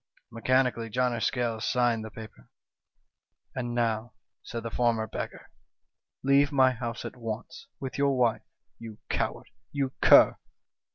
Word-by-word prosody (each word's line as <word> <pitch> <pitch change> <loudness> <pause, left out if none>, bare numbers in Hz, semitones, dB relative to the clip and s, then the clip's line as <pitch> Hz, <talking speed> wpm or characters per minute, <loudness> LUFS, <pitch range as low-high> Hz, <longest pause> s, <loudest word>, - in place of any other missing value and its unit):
" - - -36
Mechanically 120 0 +1
John 125 +2 +1
o' 115 - -2
Scales 115 -2 -1
signed 120 -3 +1
the 110 - -7
paper. 110 - -12 1.0
"'And 120 -2 -3
now,' 115 -1 -1 0.3
said 115 -1 -6
the 115 - -5
former 115 -2 +1
beggar, - - -7 0.7
'leave 140 +2 +4
my 130 -2 +5
house 120 -1 -5
at - - -6
once, 115 - -7
with 135 0 -5
your 140 -1 +2
wife 120 -3 +2 0.4
you 115 -2 -9
coward! - - -2 0.2
you 140 -2 -1
cur - - +7
120 Hz, 145 wpm, -28 LUFS, 115-130 Hz, 1.0 s, cur